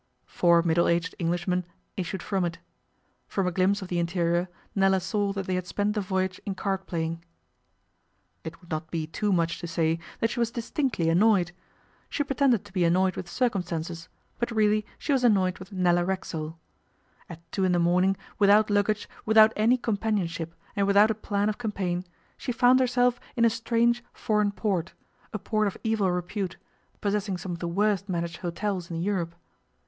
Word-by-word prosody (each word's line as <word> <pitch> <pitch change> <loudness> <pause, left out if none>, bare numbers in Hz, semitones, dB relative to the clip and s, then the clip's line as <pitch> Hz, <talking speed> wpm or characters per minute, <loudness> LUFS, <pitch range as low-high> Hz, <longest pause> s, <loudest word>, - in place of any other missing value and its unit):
Four 170 -1 +3
middle 170 0 +3
aged 170 +1 +1
Englishmen 175 +1 0 0.3
issued 185 0 -4
from 195 -3 0
it. 170 -1 -2 0.7
From 195 - -1
a 180 - +1
glimpse 190 +3 +1
of - - -7
the 175 -1 -1
interior 170 +1 0 0.2
Nella 195 -1 +3
saw 200 +2 -1
that 195 -1 -3
they 185 - -2
had 180 -1 -2
spent 205 +2 0
the 210 - -1
voyage 190 -1 -2
in 195 - -4
card 190 0 -2
playing. 165 0 -3 1.2
It 165 +1 -7
would 175 -2 -18
not 155 +1 -3
be 165 -2 -2
too 205 +6 -1
much 170 -2 +1
to 170 - -5
say 165 -1 0 0.2
that 225 - +1
she - - -3
was 235 -1 +2
distinctly 235 - -1
annoyed. 180 +1 +4 0.6
She 290 - 0
pretended 275 -6 +2
to 205 - -15
be 185 -3 +1
annoyed 185 +2 +3
with 175 - -6
circumstances, 175 -7 -2 0.3
but 235 - 0
really 215 -2 +2
she 290 - -1
was 260 -2 +2
annoyed 190 -6 +3
with 185 +2 -11
Nella 175 -2 +2
Racksole. 165 -4 -3 0.7
At 165 0 -12
two 195 - -1
in 185 - +3
the 175 - +3
morning, 180 +3 +3 0.2
without 210 +1 +5
luggage, 205 +1 +1 0.2
without 220 0 +6
any 230 +4 +3
companionship, 200 -8 -2 0.2
and 200 -1 +1
without 205 +2 +5
a - - +1
plan 205 -1 -1
of 215 +1 -2
campaign, 185 -6 -2 0.3
she 250 - -3
found 250 +1 +5
herself 245 -1 +2 0.2
in 235 - +4
a 230 - +4
strange 235 +1 +1
foreign 210 -3 +1
port 190 -4 -2 0.4
a 215 - -2
port 215 +1 0
of 200 - -4
evil 220 -4 +1
repute, 180 +2 -3 0.4
possessing 200 -2 -1
some 180 +1 -6
of 170 - -5
the 170 - -3
worst 200 +2 0
managed 170 -2 -2
hotels 180 +1 -3
in 165 -1 -4
Europe. 175 -2 -1
190 Hz, 180 wpm, -27 LUFS, 175-215 Hz, 1.2 s, without